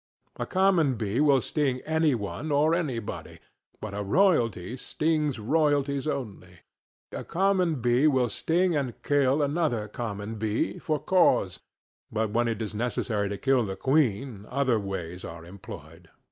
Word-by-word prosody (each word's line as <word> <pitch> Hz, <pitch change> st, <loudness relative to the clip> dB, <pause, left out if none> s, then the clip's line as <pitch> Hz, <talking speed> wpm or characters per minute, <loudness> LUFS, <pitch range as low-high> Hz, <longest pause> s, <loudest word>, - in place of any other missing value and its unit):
A -, -, -3 dB
common 185 Hz, -8 st, +3 dB
bee 110 Hz, +3 st, -1 dB
will 140 Hz, -3 st, +4 dB
sting 135 Hz, -3 st, -1 dB
any 160 Hz, -3 st, +1 dB
one 115 Hz, +8 st, -4 dB
or 150 Hz, +3 st, +3 dB
anybody, 135 Hz, -11 st, -3 dB, 0.4 s
but 105 Hz, -2 st, -6 dB
a 105 Hz, -, -3 dB
royalty 115 Hz, -, +2 dB
stings 150 Hz, +1 st, -1 dB
royalties 145 Hz, +3 st, +1 dB
only. 100 Hz, -, -5 dB, 0.5 s
A -, -, -5 dB
common 180 Hz, -5 st, +1 dB
bee 120 Hz, +5 st, +3 dB
will 130 Hz, -4 st, +3 dB
sting 170 Hz, -, +1 dB
and 135 Hz, -5 st, -2 dB
kill 145 Hz, 0 st, +2 dB
another 145 Hz, -7 st, 0 dB
common 105 Hz, -1 st, -5 dB
bee, 105 Hz, -2 st, -1 dB
for 155 Hz, -, -1 dB
cause, 150 Hz, -, +2 dB, 0.5 s
but 110 Hz, -1 st, -1 dB
when 120 Hz, +2 st, +1 dB
it 115 Hz, -1 st, -2 dB
is 110 Hz, -, -5 dB
necessary 110 Hz, -2 st, -1 dB
to 100 Hz, -, -4 dB
kill 135 Hz, 0 st, +2 dB
the 95 Hz, -3 st, -4 dB
queen 125 Hz, -6 st, 0 dB
other 130 Hz, -3 st, +1 dB
ways 95 Hz, -3 st, -5 dB
are 85 Hz, 0 st, -8 dB
employed. 85 Hz, -2 st, -11 dB
125 Hz, 145 wpm, -27 LUFS, 105-150 Hz, 0.5 s, will